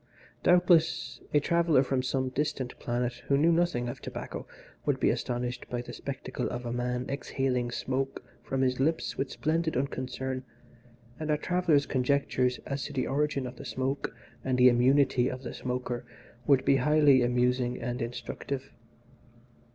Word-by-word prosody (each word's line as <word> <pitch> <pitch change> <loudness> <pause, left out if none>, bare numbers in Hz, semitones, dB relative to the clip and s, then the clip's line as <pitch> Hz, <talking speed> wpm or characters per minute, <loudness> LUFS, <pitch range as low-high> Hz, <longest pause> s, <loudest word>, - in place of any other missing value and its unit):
Doubtless, 175 -2 +3
a 150 - +5
traveller 165 -3 +3
from 130 -1 0
some 130 0 -1
distant 135 -2 -2
planet, 120 0 -2
who 140 - +3
knew 160 +4 +4
nothing 165 -8 +1
of 120 - -6
tobacco, - - -6 0.4
would - - 0
be - - +3
astonished 125 0 -3
at 120 0 -3
the - - -8
spectacle 130 -1 -4
of 120 0 -5
a 120 - -2
man 125 0 -1
exhaling 135 -3 -1
smoke 135 +2 -2 0.2
from 135 - -2
his 130 -1 +1
lips 160 +5 0
with 135 - -2
splendid 160 -1 0
unconcern, 130 -1 -3 0.8
and 155 0 -4
our 150 - +3
traveller's 170 -3 +2
conjectures 130 -1 +1
as 140 -1 -3
to 145 - -6
the 130 - 0
origin 140 -1 0
of 125 0 -7
the - - -8
smoke 135 +2 -2 0.3
and 130 -1 0
the 125 0 +8
immunity 130 +1 +4
of 130 0 -6
the 120 - -5
smoker 125 -1 -3 0.4
would 140 -3 +4
be 135 - +5
highly 145 -1 +5
amusing 125 0 +1
and 125 +1 -3
instructive. 125 +3 -5
130 Hz, 160 wpm, -29 LUFS, 125-145 Hz, 0.8 s, the